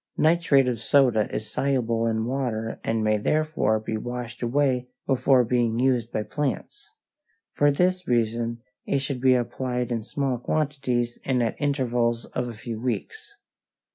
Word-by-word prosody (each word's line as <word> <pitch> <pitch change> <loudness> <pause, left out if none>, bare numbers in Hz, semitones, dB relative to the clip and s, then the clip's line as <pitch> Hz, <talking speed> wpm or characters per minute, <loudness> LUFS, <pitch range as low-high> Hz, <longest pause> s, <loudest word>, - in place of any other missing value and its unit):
Nitrate 155 -5 +4
of 120 -2 -1
soda 125 -7 +3
is 110 - -4
soluble 120 -4 0
in 110 0 0
water 120 -4 -2
and 115 -1 0
may 110 0 +2
therefore 155 -4 +1
be 110 0 -3
washed 120 +1 -6
away 125 0 +1 0.2
before 130 -1 +4
being 120 -1 +1
used 125 -2 +1
by 110 - -1
plants. 150 - -4 0.6
For 145 - +3
this 180 +5 +1
reason 115 0 0 0.2
it - - 0
should 135 -2 -3
be 130 -1 +5
applied 125 0 -2
in 115 -2 -1
small 130 +2 -2
quantities 125 -4 -1
and 125 -2 +1
at 115 - -1
intervals 120 -5 0
of 125 -1 -1
a 120 - -6
few 115 0 -6
weeks. 415 - -4
125 Hz, 150 wpm, -25 LUFS, 115-140 Hz, 0.6 s, be